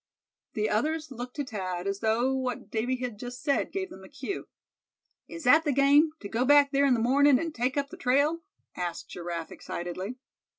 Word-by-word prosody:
The 215 0 0
others 305 +8 -1
looked 250 0 -7
to 290 - -2
Thad, 185 -6 -4
as 195 0 -2
though 230 +4 +1
what 255 -2 -3
Davy 235 +3 0
had 250 -4 -5
just 245 +1 -7
said 280 - +1
gave 380 -1 -3
them 190 - -11
a - - -13
cue. 290 +7 -5 0.8
"Is 335 - -8
that 290 +5 +6
the 295 - +1
game, 280 +3 +5
to 200 - -5
go 225 +4 0
back 285 +1 +6
there 280 0 +3
in 255 - +4
the - - -1
mornin', 270 +4 +5
an' 330 +4 -3
take 255 0 -1
up 280 0 0
the - - -9
trail?" 285 +6 +2 0.4
asked 175 -2 -4
Giraffe, 170 -2 -5
excitedly. 185 +7 -5
255 Hz, 200 wpm, -28 LUFS, 215-285 Hz, 0.8 s, that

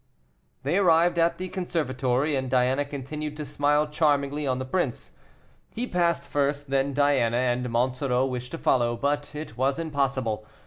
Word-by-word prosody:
They 150 +7 +1
arrived 170 -1 +4
at 165 +1 +2
the 185 - -4
conservatory, 145 -6 -1
and 130 -1 -2
Diana 130 +2 +2
continued 150 +2 -6
to 150 - -4
smile 145 +2 +2
charmingly 145 -1 +1
on 130 -1 +1
the 130 - -4
prince. 175 +7 -2 0.6
He 240 +2 -3
passed 175 -6 0
first, 145 0 -1
then 135 +1 +1
Diana, 135 -5 +3
and 125 0 0
Monsoreau 125 +2 +1
wished 125 -1 -4
to - - -3
follow, 120 -6 +1
but 145 +3 -1
it 150 -6 -7
was 135 +3 +1
impossible. 135 -8 -1
140 Hz, 160 wpm, -26 LUFS, 130-150 Hz, 0.6 s, arrived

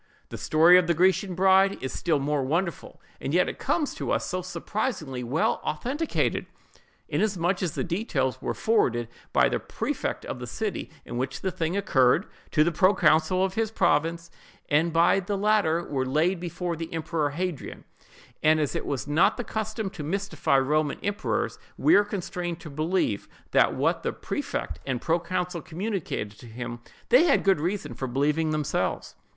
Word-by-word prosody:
The - - -6
story 170 +4 +6
of 180 - 0
the 170 - +2
Grecian 185 +2 +2
bride 190 +1 +4
is 130 - -4
still 165 -4 +1
more 145 +1 0
wonderful, 170 +7 -2 0.2
and - - -2
yet - - +4
it - - -5
comes 305 -4 0
to - - -5
us - - +1
so 185 0 -2
surprisingly 180 - -3
well 130 +7 0
authenticated, 270 - -1 0.6
inasmuch 190 -3 0
as 175 -4 -1
the - - -1
details 170 - -1
were - - -2
forwarded 120 - +1 0.2
by - - +4
the - - -1
prefect - - -3
of - - -5
the - - -6
city - - -3 0.2
in 120 - -5
which 130 +2 -3
the 190 - -1
thing 170 +2 -2
occurred, 155 -4 +3 0.2
to 150 - +4
the 170 - +1
proconsul 175 0 +3
of 190 - -3
his 225 +1 0
province, 165 -3 +1 0.4
and 160 +3 +3
by 170 +4 +4
the 195 +1 -2
latter 195 -5 +2
were 135 -5 -2
laid 155 +8 +1
before 175 0 -3
the 165 0 -6
emperor 160 -2 -1
Hadrian—and 155 -1 -3
as 150 -3 -1
it - - -3
was 140 -3 -2
not 170 +8 +3
the 245 - -2
custom 220 -2 -3
to 195 - -8
mystify 160 -3 0
Roman 145 +2 +1
emperors—we 205 +9 -1
are 205 - +7
constrained 180 -4 -4
to 155 - -9
believe 155 - -1 0.2
that - - +4
what - - +1
the - - -2
prefect - - -4
and 130 -2 -2
proconsul 175 +2 -1
communicated 175 - -3
to 120 - -12
him, 120 +1 -6 0.3
they 260 +8 +6
had 305 - +3
good 195 -5 +3
reason 190 +5 -2
for 130 - -4
believing 150 +5 +1
themselves. 155 -2 -1
170 Hz, 170 wpm, -26 LUFS, 150-190 Hz, 0.6 s, are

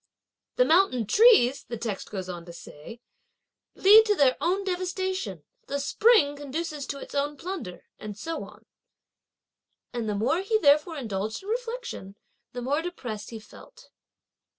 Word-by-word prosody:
'The - - +4
mountain 320 - +3
trees,' 400 - +5
the 235 - -6
text 215 -3 -5
goes 190 -3 -5
on 175 -2 -7
to 170 - -11
say, 170 +6 -12 0.8
'lead 425 +3 +8
to 420 -1 +1
their 275 -6 +4
own 380 +3 0
devastation; 370 - -3 0.2
the 280 - -2
spring 290 - +3
(conduces) 290 0 -5
to 280 - -4
its - - -10
own 290 +1 -1
plunder; 335 - -7
and 210 -1 -8
so 325 +9 -5
on." - - -14 1.3
And 235 -3 -3
the 210 - -1
more 240 - +1
he 435 +3 +1
therefore 300 -2 +3
indulged 220 - -4
in 400 - -9
reflection, 475 - -5 0.4
the 245 0 -6
more 285 +5 0
depressed 245 -12 -6
he 225 - -8
felt. 220 - -16
285 Hz, 150 wpm, -26 LUFS, -, 1.3 s, lead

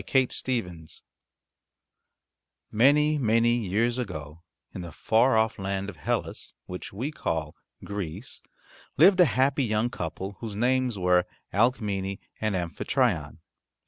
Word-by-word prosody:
CHAPTER 130 0 +1
II 125 -2 +2
HERCULES 85 -3 -12 1.7
Many, 150 +6 +4
many 115 -1 +3
years 115 +6 +1
ago 80 - -6 0.3
in 95 - -6
the 85 -1 -7
far 115 - +3
off 110 -1 +1
land 95 +1 -2
of 90 - -10
Hellas, - - -3
which 90 0 -7
we 125 +10 -3
call 80 - -3 0.3
Greece, 100 +1 -5 0.6
lived 185 +6 +6
a 180 - +8
happy 135 - +2
young 110 +1 0
couple 95 +3 -5
whose 110 -3 -6
names 125 0 +1
were 90 -1 +3 0.3
Alcmene 100 -3 +1 0.2
and 110 -2 0
Amphitryon. 85 - -1
105 Hz, 125 wpm, -27 LUFS, 90-125 Hz, 1.7 s, a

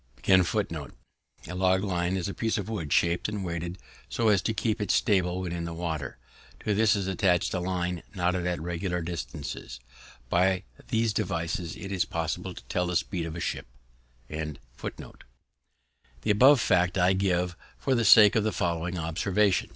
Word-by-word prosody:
A - - -23
piece 95 -2 +5 2.1
of 100 +1 -4
wood 85 -10 -4
shaped 85 +3 +2
and 105 -2 -4
weighted 85 +1 -4 0.3
so 115 -2 +1
as 100 -3 +4
to - - 0
keep 110 0 -1
it 105 - -2
stable 90 -3 +2
when 90 -2 -4
in 85 -1 -3
the 85 -1 -5
water. 80 -6 -4 0.4
To 105 - 0
this 110 +1 +4
is 100 -2 -1
attached 95 -1 +1
a 90 - 0
line 90 -1 -2
knotted 90 0 0
at 90 -1 -1
regular 85 +1 -2
distances. 75 -5 -6 0.5
By 90 +6 +2 0.2
these 115 -1 +1
devices 85 -4 -2
it 100 - -7
is 95 -2 +1
possible 80 -1 -3
to - - -10
tell 90 0 -1
the 90 - -2
speed 85 -2 -1
of 80 - -6
a - - -5
ship. - - -3 0.6
The 80 +1 -4 1.8
above 130 +7 +7
fact 90 -2 +2
I 90 +1 +4
give 90 -2 0 0.2
for 135 - 0
the 120 -2 +2
sake 110 +1 +8
of 110 - +3
the 110 - +1
following 85 0 -1
observation. 90 +5 +1
90 Hz, 160 wpm, -28 LUFS, 85-100 Hz, 2.1 s, sake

